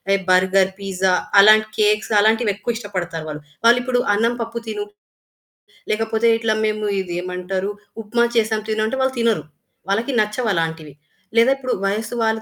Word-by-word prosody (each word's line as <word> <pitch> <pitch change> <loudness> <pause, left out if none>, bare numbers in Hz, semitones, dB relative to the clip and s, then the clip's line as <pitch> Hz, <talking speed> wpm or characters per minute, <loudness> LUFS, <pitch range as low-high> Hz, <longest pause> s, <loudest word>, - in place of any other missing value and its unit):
ఎ - - +1
burger, 190 +1 +3
pizza 190 -1 0 0.3
అలాంటి 215 +1 +6
cakes 210 +1 +2
అలాంటివెక్కువ 220 +1 +1
ఇష్టపడతారు 180 -7 -5
వాళ్ళు. 150 0 -6 0.2
వాళ్ళు 240 +1 +6
ఇప్పుడు 245 0 0
అన్నం 230 +3 +1
పప్పు 230 +1 -6
తిను, 415 - -4 1.1
లేకపోతే 225 +1 0
ఇట్లా 220 -1 0
మేము 215 0 -2
ఇది 180 -2 -5
ఏమంటారు, 180 +2 -3 0.3
ఉప్మా 235 +3 +1
చేసాం 220 -1 +1
తిను 215 0 0
అంటే, 265 +4 -3
వాళ్ళు 265 0 0
తినరు. 230 -2 +1 0.5
వాళ్ళకి 230 +7 0
నచ్చవలాంటివి. 165 - -2 0.4
లేదా, 230 +3 +5
ఇప్పుడు 255 -2 -3
వయసు 215 +4 -2
వాళ్ళు 220 0 0
215 Hz, 145 wpm, -20 LUFS, 190-230 Hz, 1.1 s, అలాంటి